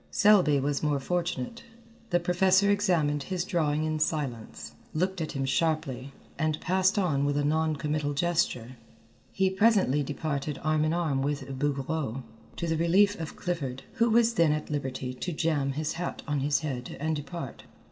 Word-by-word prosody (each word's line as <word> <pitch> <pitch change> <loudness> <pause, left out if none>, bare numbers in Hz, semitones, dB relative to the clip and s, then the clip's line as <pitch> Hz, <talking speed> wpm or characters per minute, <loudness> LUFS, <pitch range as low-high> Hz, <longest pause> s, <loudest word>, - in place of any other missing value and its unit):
Selby 190 -9 +5
was 140 +1 -1
more 150 -2 +1
fortunate. 175 - -2 0.5
The 175 - +3
professor 185 +3 +3
examined 170 -8 +2
his 180 +3 -2
drawing 155 -5 0
in 155 0 -1
silence, 140 -8 -3 0.2
looked 185 +2 0
at 155 - -3
him 135 -2 -1
sharply, 140 -2 -1 0.3
and 155 -1 0
passed 190 +1 +2
on 155 -8 +1
with 145 0 +1
a 145 - +1
non 160 +1 +1
committal 150 0 -2
gesture. 140 -7 0 0.5
He 190 -1 +1
presently 190 - +3
departed 145 0 -3
arm 155 0 +2
in 155 - +1
arm 155 -6 0
with 145 0 -2
Bouguereau, 140 -2 -2 0.3
to 170 - -3
the 160 -1 0
relief 195 +5 +3
of 160 -1 -6
Clifford, 140 -8 -3
who 235 +1 +3
was 235 +1 +4
then 165 -7 +3
at 150 0 -4
liberty 130 -3 -3
to 175 +8 -4
jam 150 -4 0
his 150 +2 -2
hat 175 +1 -4
on 145 -1 0
his 145 +3 +1
head 130 -5 -5
and 160 +2 0
depart. 145 -3 -7
155 Hz, 165 wpm, -28 LUFS, 140-175 Hz, 0.5 s, Selby